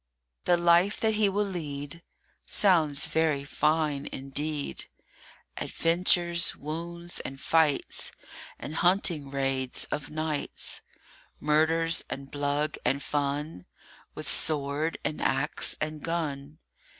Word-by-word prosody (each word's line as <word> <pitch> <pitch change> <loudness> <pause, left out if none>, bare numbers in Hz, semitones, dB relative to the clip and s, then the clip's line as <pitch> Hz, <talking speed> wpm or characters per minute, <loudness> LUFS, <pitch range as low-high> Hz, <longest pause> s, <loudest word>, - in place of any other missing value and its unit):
THE 175 - +4
life 175 +4 +4
that 220 -1 +2
he 210 -1 +3
will 205 +2 0
lead 150 -4 -5 0.5
Sounds 160 -8 +4
very 155 -3 +1
fine 150 0 0
indeed: 145 +2 -2 0.7
Adventures, 170 0 +3
wounds, 170 +3 -5
and 135 0 -7
fights, 160 -2 +1 0.5
And 155 +3 -6
hunting 175 -5 +2
raids 135 -2 0
of 145 - -3
nights; 155 -1 -2 0.6
Murders 160 +2 +2
and 135 0 -6
blug 145 +1 -1
and 140 - +1
fun 145 - -2 0.5
With - - -6
sword 150 +1 +1
and 150 - -2
axe 135 +3 0
and 155 0 -3
gun. 150 -3 -3
155 Hz, 105 wpm, -28 LUFS, 140-170 Hz, 0.7 s, THE